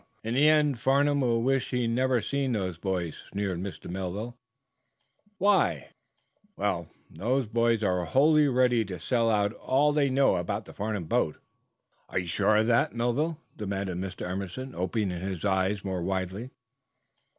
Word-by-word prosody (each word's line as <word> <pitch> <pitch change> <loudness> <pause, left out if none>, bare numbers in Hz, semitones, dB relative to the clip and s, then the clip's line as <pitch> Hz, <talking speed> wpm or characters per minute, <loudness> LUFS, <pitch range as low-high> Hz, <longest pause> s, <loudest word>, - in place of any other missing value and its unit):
"Humph! - - -35 0.2
In 115 +1 -2
the 145 +4 +5
end 150 -5 +3
Farnum 140 +3 +3
will 115 -2 +1
wish 135 0 +1
he 125 -2 0
never 125 +1 +1
seen 140 0 -1
those 95 -6 -2
boys," 90 -4 -2
sneered 100 -3 -2
Mr. 95 +1 -6
Melville. 95 +6 -4 1.0
"Why?" 200 +1 +2 0.7
"Well, 85 -5 -1 0.2
the 125 +4 -1
boys 115 -1 +2
are 90 -3 +1
wholly 150 - +4
ready 125 -3 +3
to 90 -3 -6
sell 115 - +1
out 105 -1 +2
all 145 +5 +2
they 145 -2 +2
know 135 -7 +3
about 85 0 -3
the - - -12
Farnum 105 -2 -3
boat." 80 - 0 0.7
"Are - - -3
you 90 -1 -1
sure 100 +5 +2
of 110 - +3
that, 120 0 +2
Melville?" 135 +7 0 0.2
demanded 100 -3 -3
Mr. 95 0 -5
Emerson, 100 +8 -5
opening 95 +2 -1
his 95 -1 -4
eyes 95 +1 +1
more 95 -2 -2
widely. 95 +5 -3
110 Hz, 160 wpm, -28 LUFS, 95-130 Hz, 1.0 s, the